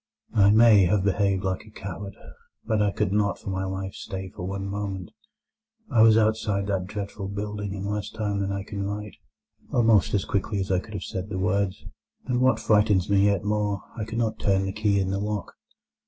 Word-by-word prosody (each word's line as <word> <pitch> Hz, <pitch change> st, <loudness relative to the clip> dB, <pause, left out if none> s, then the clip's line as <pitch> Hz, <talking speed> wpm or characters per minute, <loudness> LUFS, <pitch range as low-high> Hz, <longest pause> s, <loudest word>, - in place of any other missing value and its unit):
I 100 Hz, -2 st, +5 dB
may 110 Hz, -2 st, +7 dB
have 95 Hz, +2 st, +2 dB
behaved 100 Hz, -1 st, +1 dB
like 95 Hz, -1 st, -2 dB
a 110 Hz, -, -15 dB
coward, 100 Hz, -1 st, -7 dB, 0.5 s
but 110 Hz, -2 st, +1 dB
I 105 Hz, -, +3 dB
could 100 Hz, -1 st, -1 dB
not 100 Hz, -2 st, +1 dB
for 95 Hz, -, -6 dB
my 95 Hz, 0 st, -2 dB
life 95 Hz, 0 st, -4 dB
stay 95 Hz, 0 st, -6 dB
for 90 Hz, -, -5 dB
one 100 Hz, 0 st, -4 dB
moment. 100 Hz, -2 st, -4 dB, 0.8 s
I 110 Hz, -, +4 dB
was 110 Hz, 0 st, +7 dB
outside 110 Hz, -2 st, +1 dB
that 95 Hz, -2 st, -1 dB
dreadful 100 Hz, -1 st, -5 dB
building 100 Hz, 0 st, -4 dB
in 100 Hz, 0 st, -5 dB
less 105 Hz, +1 st, -2 dB
time 105 Hz, -2 st, -2 dB
than 100 Hz, 0 st, -1 dB
I 100 Hz, 0 st, -3 dB
can 100 Hz, 0 st, -6 dB
write—almost 105 Hz, +1 st, -1 dB
as 100 Hz, -, 0 dB
quickly 100 Hz, +1 st, -1 dB
as 95 Hz, 0 st, -2 dB
I 90 Hz, -, +3 dB
could 105 Hz, +3 st, -10 dB
have 95 Hz, -, -4 dB
said—the 95 Hz, +1 st, -4 dB
words; 95 Hz, +1 st, 0 dB, 0.4 s
and 125 Hz, -1 st, 0 dB
what 130 Hz, +1 st, +4 dB
frightens 105 Hz, -3 st, +3 dB
me 100 Hz, 0 st, +5 dB
yet 100 Hz, -2 st, +2 dB
more, 105 Hz, -2 st, -1 dB
I 110 Hz, -, -3 dB
could 115 Hz, +1 st, -5 dB
not 110 Hz, -2 st, -1 dB
turn 95 Hz, -1 st, +2 dB
the 95 Hz, -, -3 dB
key 105 Hz, -1 st, +1 dB
in 95 Hz, 0 st, 0 dB
the 100 Hz, -, -1 dB
lock. 105 Hz, 0 st, -3 dB
100 Hz, 200 wpm, -25 LUFS, 95-105 Hz, 0.8 s, may